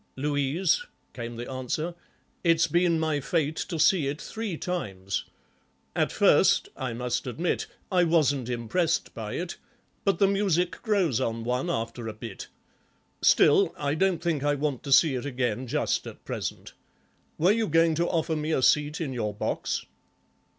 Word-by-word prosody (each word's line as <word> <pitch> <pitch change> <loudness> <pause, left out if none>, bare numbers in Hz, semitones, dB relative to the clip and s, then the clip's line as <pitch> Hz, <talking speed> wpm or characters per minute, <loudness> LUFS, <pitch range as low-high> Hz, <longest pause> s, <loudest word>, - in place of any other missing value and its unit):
"'Louise,'" 150 - 0 0.3
came 120 -1 -6
the 120 +1 -6
answer, 135 +6 -3 0.5
"it's 165 -1 +4
been 175 -1 +2
my 160 -2 0
fate 155 +2 0
to 170 - -3
see 160 -1 +4
it 145 +3 -3
three 220 -6 -5
times. 100 - -3 0.7
At - - +1
first, - - +4
I 130 -2 -3
must 125 +2 -2
admit, 165 +8 -1 0.2
I 180 -2 +4
wasn't 145 -7 +2
impressed 125 +8 0
by 110 -2 -5
it, 175 0 -4 0.5
but 195 - +2
the 200 - +4
music 195 -3 +1
grows 185 - +1
on 115 -2 -2
one 125 +2 -1
after 115 +1 -3
a 110 - -4
bit. 110 -1 -8 0.7
Still, - - +5
I 145 0 -1
don't 180 +1 +1
think 160 -5 0
I 145 0 +2
want 145 -3 -2
to 140 - -4
see 150 +2 +6
it 125 +1 -3
again 125 -2 -2
just - - 0
at - - -11
present. - - -5 0.6
Were 175 +5 +4
you 225 +1 +1
going 165 +1 +4
to 170 +2 0
offer 160 -1 0
me 155 +1 -1
a 130 - +1
seat 150 +4 +3
in 140 -5 -2
your 105 -4 -2
box?" - - -2
150 Hz, 165 wpm, -27 LUFS, 125-170 Hz, 0.7 s, see